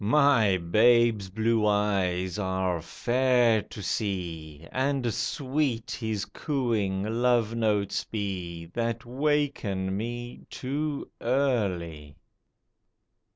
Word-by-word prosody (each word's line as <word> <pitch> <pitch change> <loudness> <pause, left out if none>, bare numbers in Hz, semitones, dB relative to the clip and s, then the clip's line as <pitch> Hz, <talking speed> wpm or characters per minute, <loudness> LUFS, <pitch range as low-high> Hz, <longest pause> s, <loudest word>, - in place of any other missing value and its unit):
My 115 -5 +4
babe's 110 +3 +3
blue 110 +2 +1
eyes 95 -3 +1
are 95 -3 -1
fair 120 +3 +2
to 105 - -10
see; 85 -7 -3
And 130 -3 0
sweet 135 -4 -1
his 110 -4 -2
cooing 115 -10 -1
love 115 0 +1
notes 105 -3 0
be 90 -6 -4
That 115 0 -2
waken 125 -8 0
me 120 +3 -5
too 145 +2 -3
early 95 - -1
110 Hz, 90 wpm, -27 LUFS, 95-125 Hz, -, My